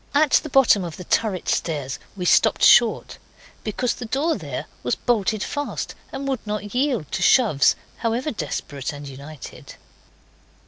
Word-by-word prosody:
At 295 -1 +4
the 305 - +3
bottom 250 -8 +4
of 170 -3 -6
the 180 - -7
turret 195 0 0
stairs 145 -5 -2 0.2
we 180 - -3
stopped - - +3
short. - - +5 0.4
Because 235 +3 -1
the 240 - -7
door 300 +8 0
there 145 -9 -5 0.2
was 125 - 0
bolted 215 -3 0
fast 290 0 -4 0.2
and 275 0 -5
would 265 -3 -1
not 210 -1 -4
yield 250 - 0
to 190 -1 -2
shoves, 190 - +4 0.2
however 240 +6 -1
desperate 145 - -4
and 145 0 -8
united. 140 +2 -10
210 Hz, 150 wpm, -23 LUFS, 155-255 Hz, 0.4 s, short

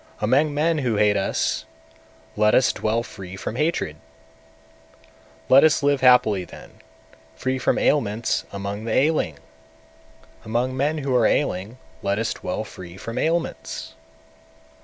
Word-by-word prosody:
among 135 +8 +2
men 155 +2 +1
who 125 -5 0
hate 105 0 +3
us 95 -1 -1 0.7
let 105 0 +3
us 130 - +4
dwell 110 +2 -1
free 95 -6 -9
from 100 - -5
hatred! 150 - -1 1.5
198. - - -11
Let 135 - +8
us 155 -2 +3
live 145 -1 +2
happily 125 -7 +5
then, - - -14 0.5
free 130 0 -2
from - - +1
ailments 115 -5 +1
among 100 +2 -5
the 115 - -3
ailing! 135 - +1 1.1
among 120 +4 -1
men 145 +4 0
who 135 -3 -1
are 120 -3 +4
ailing 105 -3 -1 0.2
let 100 0 0
us 115 +1 -1
dwell - - -4
free 90 0 -11
from 115 +3 -5
ailments! 160 - -2
115 Hz, 140 wpm, -23 LUFS, 100-140 Hz, 1.5 s, Let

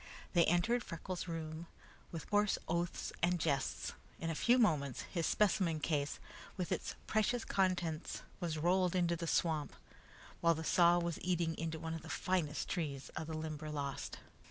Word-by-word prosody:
They 170 -2 +6
entered 200 +9 +3
Freckles' 175 +2 -5
room 165 0 -4 0.4
with 165 -2 -6
coarse 205 -1 +3
oaths 170 +1 -1
and 175 +1 +3
jests. 140 -5 0 0.2
In 165 0 -2
a - - -1
few 235 +10 +4
moments, 150 - +2
his 170 -4 -1
specimen 185 -6 +2
case 145 -2 0 0.4
with 180 -2 -2
its - - -2
precious 225 +2 +1
contents 175 -4 0 0.2
was 170 -4 -2
rolled 180 +3 +3
into 175 -1 +2
the 170 0 -4
swamp, 160 -3 +1 0.6
while 170 0 +4
the 160 - -4
saw 175 +1 +5
was 170 -1 -1
eating 170 -2 +1
into 160 0 -3
one 160 0 -4
of 165 - -4
the 160 - -10
finest 165 -6 0
trees 145 -7 -3
of 160 - -5
the 160 -1 -3
Limberlost. 150 -3 -4
170 Hz, 160 wpm, -36 LUFS, 155-180 Hz, 0.6 s, They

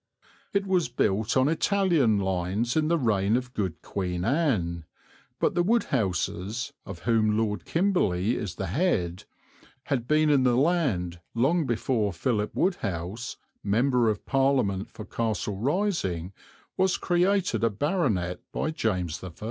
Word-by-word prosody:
It 200 0 0
was 185 -7 +1
built 110 -1 +1
on 130 +1 +4
Italian 165 - +2
lines 95 +4 -1
in 155 -1 +2
the 170 +1 +3
reign 110 -5 +2
of 125 0 -5
good 95 -8 -3
Queen 90 -2 -3
Anne, 105 - 0 0.6
but - - +2
the 175 - +2
Wodehouses, 125 - -1
of 95 -4 -8
whom 110 -2 +2
Lord 110 -2 -1
Kimberley 125 - +1
is 105 -7 -4
the 95 - -3
head, 95 - 0 0.6
had 120 -4 -2
been 155 +1 +3
in 140 -2 +4
the 125 -2 +3
land 130 - +1 0.2
long 145 +6 +2
before 110 -3 0
Philip 105 +3 -1
Wodehouse, 100 - -2 0.3
Member 120 +3 +2
of 105 -1 -3
Parliament 130 -8 +1
for 110 - -9
Castle 110 -3 -2
Rising, 120 - -1 0.4
was 190 0 +2
created 185 - +1
a 115 - +4
baronet 105 - 0
by 155 - -1
James 90 - -2
I. 90 -3 -7
115 Hz, 140 wpm, -27 LUFS, 95-155 Hz, 0.6 s, on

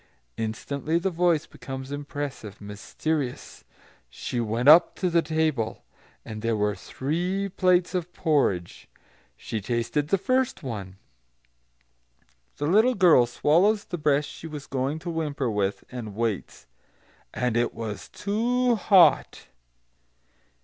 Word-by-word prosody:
Instantly 140 +8 -2
the 185 +3 -1
voice 170 -2 +2
becomes 130 0 -8
impressive, 145 -7 -6
mysterious: 125 +7 -4 0.5
"she 120 - -4
went 115 +3 -1
up 160 +4 +7
to 180 -2 -1
the 170 0 +4
table, 155 -7 -1 0.4
and 110 -1 -7
there 115 0 0
were 105 0 +1
three 175 - -2
plates 180 -1 +2
of 180 -1 -2
porridge. 135 - 0 0.5
She 110 - -5
tasted 120 +6 -1
the 195 - +2
first 255 0 0
one" 100 -7 -6 1.6
the 145 - -2
little 220 +10 +4
girl 170 - +5
swallows 185 - +2
the 175 - -5
breath 150 -1 +2
she 165 - -9
was 150 -3 -7
going 135 +3 -2
to 170 +2 -6
whimper 145 -6 -2
with, 100 0 -1
and 115 -5 -7
waits 110 - -3 0.7
"and 125 -2 -1
it 120 +1 +1
was 110 -3 -6
too 240 +5 0
hot! 195 -4 +4
145 Hz, 125 wpm, -26 LUFS, 115-175 Hz, 1.6 s, up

